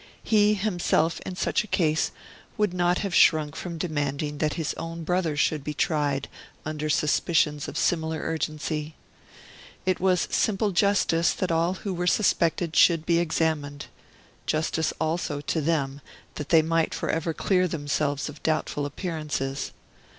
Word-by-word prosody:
He 210 Hz, -1 st, +4 dB
himself 175 Hz, -5 st, +1 dB
in 185 Hz, -, -4 dB
such -, -, 0 dB
a -, -, -11 dB
case 155 Hz, -6 st, +1 dB, 0.5 s
would 210 Hz, -4 st, +1 dB
not 180 Hz, 0 st, +2 dB
have 195 Hz, -, -3 dB
shrunk 155 Hz, -4 st, +4 dB
from 170 Hz, -2 st, -5 dB
demanding 145 Hz, -2 st, -2 dB
that 155 Hz, -1 st, 0 dB
his 160 Hz, -3 st, -2 dB
own 165 Hz, 0 st, -6 dB
brother 170 Hz, -3 st, 0 dB
should 150 Hz, -1 st, +1 dB
be 150 Hz, +1 st, -4 dB
tried, 145 Hz, -3 st, 0 dB, 0.4 s
under 155 Hz, 0 st, -3 dB
suspicions 150 Hz, -1 st, +1 dB
of -, -, -6 dB
similar 160 Hz, -1 st, 0 dB
urgency. 155 Hz, -1 st, -3 dB, 0.9 s
It 185 Hz, -1 st, +1 dB
was 185 Hz, -1 st, +2 dB
simple 210 Hz, -1 st, +1 dB
justice 180 Hz, -3 st, +2 dB
that 185 Hz, -2 st, -2 dB
all 165 Hz, +3 st, +1 dB
who 195 Hz, 0 st, -4 dB
were 175 Hz, 0 st, -2 dB
suspected 170 Hz, -2 st, +2 dB
should 165 Hz, -2 st, +5 dB
be 170 Hz, -1 st, +3 dB
examined; 155 Hz, -4 st, -1 dB, 0.6 s
justice 160 Hz, 0 st, 0 dB
also 160 Hz, -2 st, -1 dB
to 155 Hz, +2 st, -1 dB
them 140 Hz, -3 st, -1 dB, 0.3 s
that 150 Hz, -, -6 dB
they 160 Hz, -2 st, +6 dB
might 165 Hz, 0 st, +1 dB
for -, -, -3 dB
ever 165 Hz, +1 st, -1 dB
clear 185 Hz, +3 st, +1 dB
themselves 145 Hz, -2 st, -1 dB
of 150 Hz, -1 st, -9 dB
doubtful 155 Hz, -2 st, -1 dB
appearances. 145 Hz, -4 st, -3 dB
160 Hz, 150 wpm, -26 LUFS, 150-175 Hz, 0.9 s, they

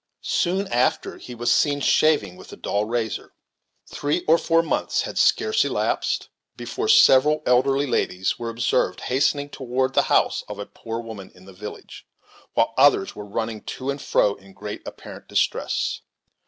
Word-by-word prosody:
Soon 190 Hz, +2 st, 0 dB
after 120 Hz, +2 st, 0 dB
he 125 Hz, -, -9 dB
was 120 Hz, +1 st, 0 dB
seen 145 Hz, -1 st, +2 dB
shaving 140 Hz, -, +2 dB
with -, -, -13 dB
a -, -, -8 dB
dull 100 Hz, +1 st, -1 dB
razor. 115 Hz, 0 st, -3 dB, 0.5 s
Three 145 Hz, +4 st, -2 dB
or 165 Hz, +2 st, +5 dB
four 165 Hz, 0 st, +2 dB
months -, -, -1 dB
had -, -, -6 dB
scarce 440 Hz, 0 st, +3 dB
elapsed -, -, -1 dB, 0.3 s
before 425 Hz, +2 st, -4 dB
several 150 Hz, -, +5 dB
elderly 135 Hz, +3 st, +3 dB
ladies 95 Hz, -7 st, -1 dB
were 120 Hz, -1 st, -4 dB
observed 115 Hz, -5 st, 0 dB
hastening 140 Hz, +2 st, 0 dB
toward 130 Hz, 0 st, -2 dB
the -, -, +4 dB
house -, -, +2 dB
of 105 Hz, -, -7 dB
a 100 Hz, -, -5 dB
poor 115 Hz, +2 st, -7 dB
woman 110 Hz, -4 st, -9 dB
in 90 Hz, -, -17 dB
the 95 Hz, -, -13 dB
village, 105 Hz, +3 st, -10 dB, 0.5 s
while 115 Hz, 0 st, +2 dB
others 145 Hz, +8 st, +4 dB
were 105 Hz, 0 st, -8 dB
running 110 Hz, +1 st, -3 dB
to 135 Hz, +1 st, -4 dB
and 140 Hz, 0 st, -6 dB
fro 100 Hz, -, +2 dB
in 95 Hz, -1 st, -17 dB
great -, -, -7 dB
apparent -, -, -10 dB
distress. -, -, -1 dB
125 Hz, 165 wpm, -23 LUFS, 105-145 Hz, 0.5 s, or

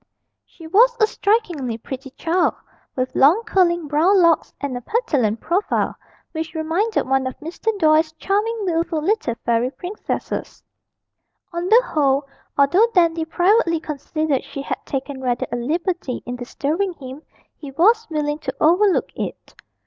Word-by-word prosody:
She 330 Hz, -, -14 dB
was 470 Hz, +9 st, +4 dB
a 435 Hz, -, +6 dB
strikingly 365 Hz, -, -1 dB
pretty 265 Hz, +3 st, -8 dB
child, 335 Hz, +6 st, 0 dB, 0.4 s
with 255 Hz, 0 st, -2 dB
long 330 Hz, +12 st, +5 dB
curling 345 Hz, -6 st, +1 dB
brown 330 Hz, +7 st, +3 dB
locks, 335 Hz, -2 st, +3 dB
and 280 Hz, -3 st, -3 dB
a 245 Hz, -, -5 dB
petulant 255 Hz, -, 0 dB
profile, 370 Hz, +5 st, 0 dB, 0.4 s
which 320 Hz, 0 st, -5 dB
reminded 330 Hz, -, 0 dB
one 265 Hz, 0 st, +1 dB
of 260 Hz, -, -6 dB
Mr. 330 Hz, +7 st, -10 dB
Doyle's 315 Hz, -2 st, +3 dB
charming 405 Hz, +9 st, -1 dB
wilful 335 Hz, -2 st, 0 dB
little 330 Hz, -, 0 dB
fairy 235 Hz, +1 st, +2 dB
princesses. 360 Hz, +9 st, -5 dB, 0.9 s
On 340 Hz, +1 st, -2 dB
the 470 Hz, +3 st, +6 dB
whole, 280 Hz, -, +1 dB, 0.3 s
although 350 Hz, +11 st, +5 dB
Dandy 335 Hz, -2 st, +3 dB
privately 350 Hz, 0 st, +2 dB
considered 305 Hz, -1 st, -2 dB
she 275 Hz, 0 st, -7 dB
had -, -, -4 dB
taken 270 Hz, 0 st, -4 dB
rather 245 Hz, -2 st, -1 dB
a -, -, -1 dB
liberty 320 Hz, +2 st, -2 dB
in 245 Hz, -, -4 dB
disturbing 305 Hz, +9 st, -2 dB
him, 265 Hz, -2 st, -10 dB, 0.3 s
he 290 Hz, -, -9 dB
was 435 Hz, -, +3 dB
willing 300 Hz, -1 st, -2 dB
to 270 Hz, -4 st, -5 dB
overlook 360 Hz, +5 st, +3 dB
it. -, -, -6 dB
320 Hz, 145 wpm, -21 LUFS, 275-370 Hz, 0.9 s, a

